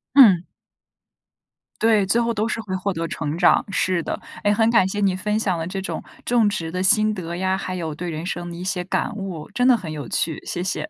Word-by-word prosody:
嗯。 195 -10 +7 1.4
对， 220 -3 +4
最 230 +5 +3
后 235 0 +1
都 215 +1 0
是 225 - -2
会 190 -3 -4
获 195 +2 -1
得 165 -1 -3
成 150 0 -3
长， 175 - +4
是 185 -2 +1
的。 - - -4 0.2
诶， 205 - +3
很 225 +2 +3
感 210 -5 +4
谢 205 +2 -3
你 195 -2 +2
分 210 +3 -1
享 185 -5 0
了 165 - -3
这 190 +1 -4
种 190 - -4 0.2
种 235 -4 +3
植 165 -5 -3
的 185 +1 -2
心 215 +2 +3
得 170 -3 -5
呀， 190 +1 0
还 185 -1 -4
有 160 -3 -3
对 175 +2 -5
人 160 +1 -5
生 175 -1 -4
的 170 - -7
一 175 - -7
些 185 -2 -2
感 210 +4 -2
悟。 190 -6 -6
真 245 +1 +2
的 250 -2 +6
很 165 -6 -7
有 145 -6 -6
趣， 160 -2 -1
谢 175 - -3
谢。 205 +10 -3
185 Hz, 255 characters per minute, -22 LUFS, 175-210 Hz, 1.4 s, 嗯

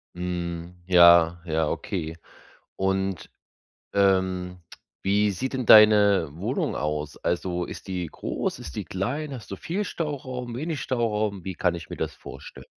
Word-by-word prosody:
Mhm, 85 -1 -4
ja, 85 -1 +7
ja, 80 -1 0
okay. 80 +1 -4 0.6
Und, 95 -1 -1 0.6
ähm, 95 -2 +1 0.4
wie 100 +1 +2
sieht 130 +8 -4
denn 130 -2 -2
deine 105 -5 +7
Wohnung 80 - -2
aus? 75 0 -3
Also 90 0 -2
ist - - -9
die 90 -2 -3
groß, - - -4
ist - - -9
die - - -3
klein? 135 +10 -3
Hast 120 -5 -9
du 100 - -3
viel 190 - -3
Stauraum, 130 -8 -4
wenig 155 +2 -3
Stauraum? 105 -6 -1
Wie 95 - -3
kann 90 -1 +1
ich 85 -2 -9
mir - - -5
das - - -3
vorstel - - -11
95 Hz, 145 wpm, -25 LUFS, 85-110 Hz, 0.6 s, ja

